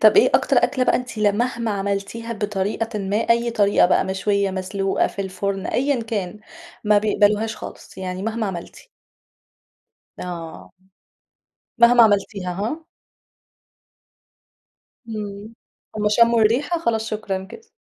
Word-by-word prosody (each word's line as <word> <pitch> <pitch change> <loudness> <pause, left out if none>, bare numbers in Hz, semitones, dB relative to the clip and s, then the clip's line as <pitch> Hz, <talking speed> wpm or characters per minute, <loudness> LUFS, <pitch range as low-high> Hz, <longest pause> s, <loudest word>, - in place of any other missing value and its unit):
طب 215 - +6
إيه 420 - +6
أكتر - - +3
أكل 255 -3 0
بقى - - +3
أنتِ 250 -3 -6
لمهما 225 +2 0
عملتيها 200 +3 -3
بطريقة 210 +1 -2
ما 195 +1 -1
أي 235 +1 +2
طريقة 205 -5 +4
بقى 185 - +2
مشوية 195 +1 0
مسلوقة 190 +1 -1
في 200 - -5
الفرن 195 +1 -3
أيًا 270 -1 0
كان 210 -2 -4 0.4
ما 210 0 +5
بيقبلوهاش 215 +1 +1
خالص، - - -10
يعني 185 0 -4
مهما 225 +1 -2
عملتِ؟ 175 -3 -8 1.3
آه، 170 -2 -7 1.1
مهما 235 0 +7
عملتيها 200 -3 +1
ها؟ 230 - -4 2.2
امم، 210 0 -6 0.4
همّ 210 0 +1
شمُّوا 230 +2 +4
الرِّيحة 270 +10 +2
خلاص 225 -8 -1
شكرًا 200 -3 -3
كده. 445 - -13
210 Hz, 120 wpm, -22 LUFS, 195-230 Hz, 2.2 s, مهما